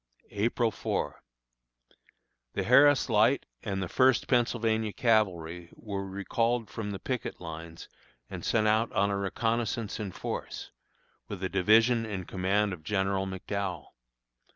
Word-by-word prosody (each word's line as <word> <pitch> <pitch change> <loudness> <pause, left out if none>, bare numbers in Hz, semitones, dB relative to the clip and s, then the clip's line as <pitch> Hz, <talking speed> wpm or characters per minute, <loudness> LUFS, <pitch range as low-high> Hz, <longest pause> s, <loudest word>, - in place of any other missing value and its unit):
April 115 +2 +1
4. - - -3 1.3
The - - -1
Harris 140 +3 +6
Light 115 +4 +3 0.2
and 95 -3 -2
the - - -3
First 130 +6 +3
Pennsylvania 115 -3 +1
Cavalry 90 -7 +1
were 100 -3 -5
recalled 115 +4 -1
from 105 -2 -4
the 100 - -4
picket 125 +4 -4
lines 80 -1 -8 0.4
and - - -7
sent 110 -1 +2
out 110 +2 +2
on 100 0 +2
a - - 0
reconnoissance 115 +2 -1
in 105 -3 -4
force, - - -5 0.6
with 95 -2 -6
a 95 - 0
division 110 +5 +4
in 100 -3 -4
command 100 +3 0
of 85 - -8
General 95 +2 0
McDowell. 95 0 -4
105 Hz, 130 wpm, -29 LUFS, 95-115 Hz, 1.3 s, Harris